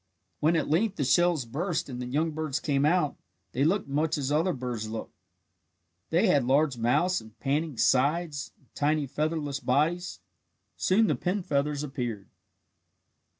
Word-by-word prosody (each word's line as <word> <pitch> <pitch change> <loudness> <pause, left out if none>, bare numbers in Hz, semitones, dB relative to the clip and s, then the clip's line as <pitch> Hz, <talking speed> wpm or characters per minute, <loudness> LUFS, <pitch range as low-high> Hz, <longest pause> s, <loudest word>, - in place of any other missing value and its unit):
When 160 +3 +3
at 160 - +1
length 195 +7 +1
the 145 - -1
shells 170 0 +3
burst 160 +9 -2
and 125 -2 -6
the 125 - -4
young 155 +6 0
birds 155 -2 -2
came 140 -2 +1
out, 160 -3 +1 0.3
they 130 - 0
looked 185 +4 +1
much 150 +3 0
as 140 -1 -2
other 160 +5 +2
birds 120 -6 -4
look. 110 0 -6 1.0
They 170 +7 +3
had 145 - +4
large 135 +2 +2
mouths 145 +11 +1
and 110 0 -16
panting 145 +1 -1
sides 145 +4 +1
and - - -30
tiny 150 0 +1
featherless 150 0 -2
bodies. 150 - 0 0.6
Soon 210 +4 +3
the - - +2
pin 185 +2 -2
feathers 145 -1 0
appeared. 120 -8 -4
150 Hz, 155 wpm, -28 LUFS, 130-165 Hz, 1.0 s, had